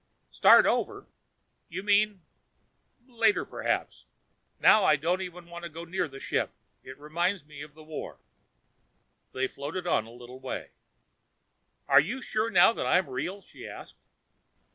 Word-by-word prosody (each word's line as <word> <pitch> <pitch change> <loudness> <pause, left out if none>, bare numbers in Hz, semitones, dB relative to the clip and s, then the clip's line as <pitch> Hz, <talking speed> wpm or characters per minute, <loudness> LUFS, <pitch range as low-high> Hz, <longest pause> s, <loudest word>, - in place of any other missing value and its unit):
"Start - - +7
over? - - -1 0.6
You 185 +3 -5
mean.... 205 -2 +2 0.8
Later 230 -5 +1
perhaps. - - -3 0.5
Now 215 - +6
I 155 - +5
don't 170 +6 -1
even 180 -2 -8
want 170 0 -9
to 170 - -6
go 165 +2 -8
near 180 0 -2
the 135 -1 -11
ship. - - -1 0.3
It 130 +1 -11
reminds 170 +4 -2
me 150 -1 -11
of 150 0 -11
the 155 - -14
war." 155 0 -7 1.1
They 130 0 -1
floated 150 +8 -6
on 115 -10 +1
a - - -13
little 125 +2 -12
way. 130 0 -6 1.2
"Are - - +7
you 210 - -1
sure 220 -3 -1
now 190 +1 +6
that - - -3
I'm 185 -3 +3
real?" 185 +10 -4
she - - -11
asked. - - -11
170 Hz, 150 wpm, -28 LUFS, 145-195 Hz, 1.2 s, Start